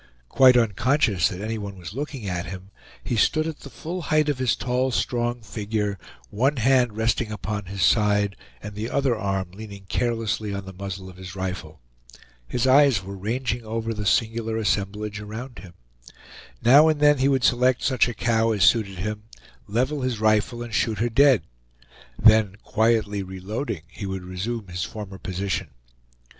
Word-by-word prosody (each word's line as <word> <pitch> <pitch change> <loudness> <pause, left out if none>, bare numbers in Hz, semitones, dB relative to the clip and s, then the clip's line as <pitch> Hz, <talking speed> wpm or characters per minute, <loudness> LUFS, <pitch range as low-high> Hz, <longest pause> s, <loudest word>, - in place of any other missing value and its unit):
Quite 130 -2 +6
unconscious 115 - +2
that 90 - -6
any 110 +1 -3
one 100 -2 -7
was 90 +1 -8
looking 135 -4 -5
at 90 -2 -3
him, 95 +1 -9 0.3
he 120 - -2
stood 155 +7 +2
at 160 -2 -5
the 140 - -10
full 175 +6 -6
height 155 0 +2
of 140 -3 -1
his 130 -3 +2
tall, 125 +1 0
strong 120 -1 -1
figure, 105 -2 -3 0.3
one 130 +7 +1
hand 125 -2 +2
resting 110 0 0
upon 105 0 -4
his 95 0 -3
side, 105 +1 +3 0.3
and 105 0 -7
the 105 +3 -4
other 135 -3 +1
arm 95 -3 -2
leaning 100 0 -10
carelessly 115 -3 -1
on 100 -1 -5
the 95 - -9
muzzle 95 0 -6
of 90 -1 -12
his 95 0 -9
rifle. 90 -6 -5 0.7
His 125 - -1
eyes 130 -6 +5
were 100 +1 -7
ranging 115 +4 -2
over 115 +1 -3
the 105 -2 -3
singular 115 +1 +1
assemblage 105 0 -1
around 115 +5 -8
him. 90 -3 -12 0.9
Now 140 +6 +7
and 155 -2 +2
then 145 -1 +5
he 135 - +3
would 135 -2 +2
select 125 +1 +3
such 130 -3 +3
a 120 - -4
cow 115 0 +1
as 100 -3 +1
suited 100 -4 +3
him, 105 +3 -4 0.4
level 130 +6 0
his 125 -4 -2
rifle, 110 +2 +1
and 120 -2 -9
shoot 110 0 +1
her 120 +4 0
dead; 130 - +5 0.7
then 110 -3 +5
quietly 110 -2 +1
reloading, 95 - -5
he 100 +2 -7
would 95 -1 -4
resume 100 +4 -4
his 90 0 -3
former 100 -3 -7
position. 95 -2 -3
110 Hz, 175 wpm, -24 LUFS, 100-125 Hz, 0.9 s, Now